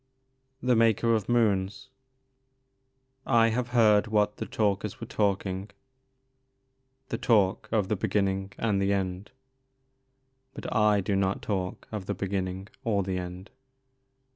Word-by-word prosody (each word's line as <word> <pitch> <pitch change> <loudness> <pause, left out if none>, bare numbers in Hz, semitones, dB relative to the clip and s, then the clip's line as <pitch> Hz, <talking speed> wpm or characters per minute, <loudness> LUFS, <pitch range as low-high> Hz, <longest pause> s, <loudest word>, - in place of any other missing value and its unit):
THE 125 -1 +3
MAKER 115 0 +3
OF 110 -2 -1
MOONS. 105 0 +1 0.7
" 130 0 -46 0.2
I 115 - +4
have 120 +2 -2
beard 110 -4 +4
what 105 -1 +1
the - - -5
Talkers 100 -2 -1
were - - -5
talking,— 100 -1 -1 1.4
the - - -3
talk 105 -1 +2
Of 105 -4 +1
the 105 - 0
beginning 95 0 -1
and 105 -4 0
the 100 +1 +2
end; 95 0 -3 1.3
Bnt - - -5
I 105 -2 +4
do 100 +1 -1
not 95 0 0
talk 95 -3 -3
of 105 -4 -5
the 100 - -2
beginning 95 0 -3 0.2
or 105 -5 +1
the 95 -1 -2
end." 90 +2 -8
105 Hz, 135 wpm, -28 LUFS, 95-115 Hz, 1.4 s, I